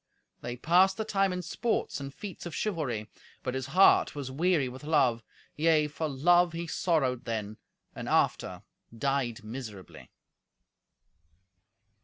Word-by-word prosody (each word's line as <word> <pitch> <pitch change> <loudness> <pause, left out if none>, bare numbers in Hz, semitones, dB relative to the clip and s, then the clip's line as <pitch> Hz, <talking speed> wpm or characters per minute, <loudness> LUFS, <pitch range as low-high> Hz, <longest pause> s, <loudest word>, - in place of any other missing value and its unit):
They 120 0 -5
passed 180 +7 +4
the 220 - -2
time 195 -2 +1
in 180 0 -3
sports 215 +3 -1
and 140 0 -6
feats 190 +3 -8
of 170 - -7
chivalry. 140 - -2 0.4
But 125 - -2
his 130 0 -3
heart 185 0 +5
was 140 -3 -5
weary 160 -1 +2
with 130 +3 -9
love; 130 -7 +2 0.3
yea, 155 -1 +3
for 155 +1 -3
love 175 +5 +3
he 170 +1 -4
sorrowed 145 -7 0
then, 110 -2 -4 0.4
and, - - -5
after, - - +1 0.3
died 135 -3 -1
miserably. 110 -4 -9
145 Hz, 135 wpm, -29 LUFS, 125-175 Hz, 0.4 s, heart